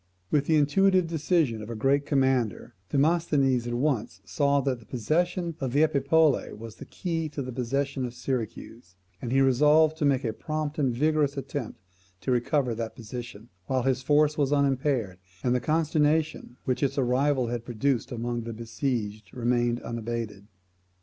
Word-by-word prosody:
With 145 -1 +2
the 160 - +4
intuitive 185 +5 +4
decision 160 -7 0
of 105 - -8
a 115 - -4
great 140 +5 +1
commander, 130 -5 +1 0.2
Demosthenes 140 -5 +2
at 120 - -2
once 120 -8 -1
saw 140 +10 +2
that 130 -2 -1
the 115 - -17
possession 170 - -1
of 130 -2 -3
Epipolae 150 0 +3
was 110 0 -10
the - - -9
key 165 -3 -3
to 145 -1 -5
the 130 - -6
possession 135 +2 -2
of 125 -1 -5
Syracuse, 115 -6 -5 0.3
and 120 - -4
he 135 +1 +4
resolved 150 +4 +4
to 155 - 0
make 140 -2 +2
a 110 - -1
prompt 155 +4 -4
and 135 -4 +2
vigorous 145 +2 +1
attempt 135 -3 -5 0.4
to 130 - -1
recover 125 +1 +1
that 115 0 -5
position, 120 -1 -8 0.2
while 130 -2 0
his 130 0 +1
force 150 +2 +3
was 140 -1 +2
unimpaired, 135 -8 +1 0.2
and 125 - +2
the 125 - +2
consternation 155 -1 0
which 130 - -1
its 140 0 0
arrival 130 0 +2
had 120 -1 -3
produced 120 +1 -1
among 120 0 -3
the 115 0 -6
besieged 110 -3 -3
remained 120 0 +1
unabated. 115 -3 -5
135 Hz, 165 wpm, -27 LUFS, 120-150 Hz, 0.4 s, the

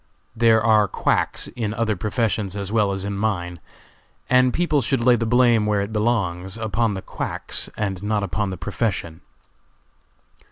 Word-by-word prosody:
There 110 -1 +4
are 110 -2 +4
quacks - - 0
in 110 -3 -4
other 115 -2 0
professions 105 -1 -1
as 100 -1 -4
well 105 -3 +2
as 95 0 -3
in 100 0 -3
mine, 90 -5 -2 0.7
and 125 0 +5
people 155 -3 +1
should 135 +2 0
lay 120 +1 +4
the 115 -1 -1
blame 120 -2 +4
where 105 -1 +1
it 100 +2 -4
belongs, 100 -4 -1
upon 110 -1 -1
the 95 - -6
quacks, - - -4
and 95 -3 -2
not 105 0 -1
upon 100 +2 -2
the 95 - -5
profession. 90 -3 -3
105 Hz, 160 wpm, -22 LUFS, 100-115 Hz, 0.7 s, and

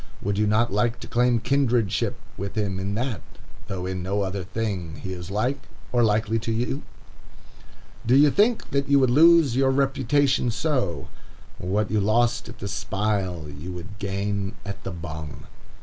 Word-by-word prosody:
Would 100 0 -1
you 105 - +3
not 110 +1 +2
like 115 +3 +1
to - - -7
claim 120 0 +2
kindredship 125 -4 +1 0.2
with 100 0 -5
him 100 -3 -1
in 100 +1 -2
that, 120 -1 -2 0.5
though 95 -3 -4
in 95 0 -3
no 100 +3 -1
other 95 0 -3
thing 95 -5 -3
he 95 +1 -6
is 90 0 -7
like, 125 +7 -1 0.3
or 120 -1 +3
likely, 110 +1 +2
to 115 +1 -3
you? 120 +5 -1 1.2
Do 120 +3 +3
you 145 +1 +6
think 220 - +2
that 140 0 0
you 140 - +6
would 130 -3 +4
lose 160 -2 +6
your 135 0 +3
reputation 135 -1 +2
so? 125 - -1 0.5
What 100 +4 -1
you 110 -1 +2
lost 115 +3 +1
at - - -10
the - - -5
spile, 95 -5 -2
you 75 +5 -7
would 90 +4 -9
gain 100 +1 -2
at 100 0 -6
the 95 - -4
bung. 80 -3 -7
110 Hz, 170 wpm, -25 LUFS, 95-125 Hz, 1.2 s, you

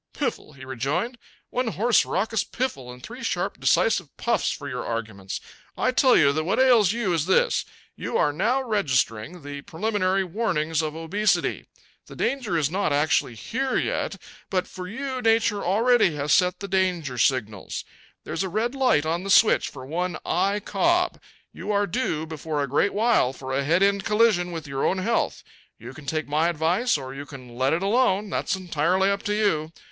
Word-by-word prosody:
"Piffle!" - - -3
he 135 -1 -11
rejoined. 150 - -2 0.3
"One 250 0 -1
hoarse 225 +1 +3
raucous 220 +2 0
piffle 140 - -4
and 125 0 -13
three - - -9
sharp - - -2
decisive - - +1
puffs - - 0
for - - -6
your - - -4
arguments! 110 -4 -4 0.4
I - - +2
tell 255 0 +5
you 140 -2 +5
that 155 +2 -1
what 175 - 0
ails 240 -7 +5
you 225 -5 -1
is 165 0 0
this: 190 - +2 0.3
You - - -3
are 145 - +2
now 240 - +1
registering, 150 - -1
the 145 0 -7
preliminary 195 +2 0
warnings 165 -5 -1
of 155 -1 -4
obesity. 180 +7 0 0.4
The - - -11
danger 245 -10 -1
is 150 -2 0
not 195 -3 0
actually 145 -4 +1
here 260 - -2
yet; - - -1 0.3
but 185 -1 0
for 180 -1 -8
you 260 +4 -4
Nature 225 -3 +2
already 220 -2 +3
has 145 +1 0
set 180 +1 +2
the 200 - -4
danger 180 -9 0
signals. 110 -6 0 0.4
There's - - -4
a 190 - -1
red 220 +6 -1
light 255 - +2
on 170 +3 -1
the 195 - -5
switch 215 +2 +5
for 130 -2 -10
one 175 +3 -2
I. 200 +3 +1
Cobb. 350 - +1 0.3
You 210 - -5
are 205 0 +2
due 170 -6 -2
before 155 -2 -3
a - - -2
great 145 +10 +1
while 215 - +3
for 130 -1 -6
a 140 +1 +1
head 170 +7 +3
end 200 0 +2
collision 210 -5 +2
with 165 -2 -6
your 135 -1 -3
own 190 - +1
health. 225 +5 -1 0.3
You - - -10
can 150 -3 -13
take 155 +2 -2
my 155 +3 +2
advice 175 +8 +1
or 130 -1 -7
you 140 +1 -8
can 125 -4 -11
let 130 +2 +1
it 170 +4 0
alone. 205 -2 +2
That's - - -1
entirely 185 +2 +1
up 200 0 -1
to 210 - 0
you. 165 -8 +1
180 Hz, 185 wpm, -25 LUFS, 145-215 Hz, 0.4 s, tell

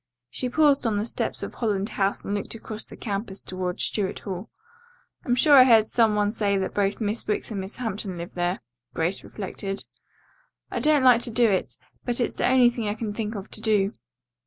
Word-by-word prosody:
She 250 - -1
paused 285 -3 +3
on 215 -2 0
the 205 - -1
steps - - -1
of - - -5
Holland 205 -3 -1
House 195 0 -1
and 200 - -2
looked 205 +2 -3
across 220 -1 -7
the - - -13
campus 200 -2 -4
toward 185 -1 -4
Stuart 200 -3 0
Hall. 190 0 -6 0.8
"I'm 245 - +2
sure 290 +4 +4
I 260 - +10
heard 225 -4 +5
some 225 -3 +3
one 205 0 +2
say 205 -3 0
that 190 - -2
both 200 -1 0
Miss 215 0 -2
Wicks 210 +2 -2
and 200 -3 -3
Miss 190 +2 -7
Hampton 210 -6 -4
live 170 0 -7
there," 175 +1 -1 0.3
Grace 170 +4 0
reflected. 195 -1 -4 0.9
"I - - -2
don't 300 -3 +3
like 250 -2 +6
to - - 0
do 235 +1 +3
it, 190 - -1 0.3
but 245 0 -1
it's 240 - 0
the - - 0
only 250 -1 +5
thing 235 -3 -4
I 205 - -1
can 215 -2 -4
think 220 0 -3
of 200 0 -7
to 220 - -6
do." 210 -2 +2
210 Hz, 210 wpm, -25 LUFS, 195-235 Hz, 0.9 s, I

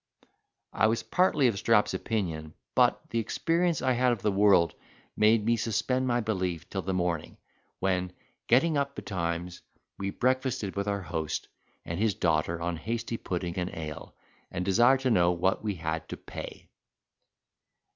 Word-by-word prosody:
I 110 - +3
was 115 +1 0
partly 180 -6 +2
of 115 -5 +2
Strap's 105 0 +3
opinion; 80 -8 -3 0.2
but - - +4
the 115 - +1
experience 165 +7 0
I 130 - +3
had 125 0 +3
of 115 -5 -3
the 105 - +2
world 95 -4 +4 0.4
made 105 0 +4
me 115 +1 +3
suspend 125 +4 0
my 120 -1 +2
belief 95 -6 -2
till - - -2
the 95 - -3
morning, 90 -3 -2 0.4
when, 90 -1 0 0.4
getting 150 +6 +4
up 140 0 -2
betimes, 85 -1 -3 0.4
we 100 0 -2
breakfasted 130 -2 0
with 100 +1 -2
our 100 -1 -1
host 80 -2 -3 0.4
and 85 +2 -4
his 105 -3 +2
daughter 80 0 +1
on 85 0 -2
hasty 115 +4 -3
pudding 90 -2 -3
and 90 0 -1
ale, 75 -2 -7 0.3
and 90 - -3
desired 120 +7 +4
to 130 -2 +1
know 90 -5 +4
what 95 +4 0
we 105 -2 -1
had 80 -1 -4
to - - -5
pay. - - -9
100 Hz, 160 wpm, -28 LUFS, 85-120 Hz, 0.4 s, but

